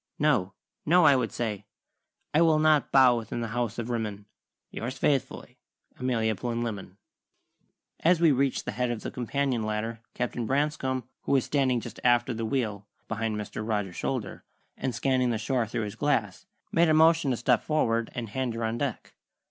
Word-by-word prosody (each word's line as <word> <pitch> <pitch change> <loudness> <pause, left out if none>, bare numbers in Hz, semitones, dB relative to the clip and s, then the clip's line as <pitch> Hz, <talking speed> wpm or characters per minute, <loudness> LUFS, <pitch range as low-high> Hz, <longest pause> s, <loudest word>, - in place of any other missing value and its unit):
'No, 125 -11 +1 0.3
no,' 175 +2 +5
I 140 - +7
would 125 -4 0
say, 105 -4 -4 0.7
"'I 155 - +4
will 160 -2 +5
not 155 -1 +3
bow 130 -3 +6
within 115 0 -4
the 115 - -3
House 120 -1 -2
of 120 +1 -3
Rimmon: 105 -3 -3 0.5
Yours 125 +3 -5
faithfully, 135 -1 -1 0.4
Amelia 115 -4 +1
Plinlimmon.'" 115 -4 -4 1.0
As 170 +1 +3
we 165 -2 +5
reached 135 0 0
the - - -2
head 125 +3 -1
of 120 -2 -3
the - - -4
companion 130 0 -1
ladder 110 +1 -3 0.2
Captain 120 -1 -2
Branscome, 135 -2 0 0.2
who - - +1
was 135 -3 +3
standing 130 -4 +1
just - - -9
aft 120 +2 +3
of 120 - -2
the 115 - -2
wheel, 110 -5 -2 0.2
behind 110 0 -2
Mr. 105 0 -5
Rogers's 105 -5 -2
shoulder, - - -3 0.3
and 130 -3 -3
scanning 130 0 +1
the 115 - 0
shore 120 +1 -1
through 110 - -2
his 105 0 -5
glass, 110 -7 -1 0.2
made 170 0 +4
a 155 - +4
motion 160 -2 +5
to 125 - 0
step 120 0 +2
forward 115 -7 0
and 115 -3 -4
hand 125 +1 -2
her 115 - -3
on 115 +1 -2
deck. 135 -4 -4
120 Hz, 180 wpm, -27 LUFS, 110-135 Hz, 1.0 s, I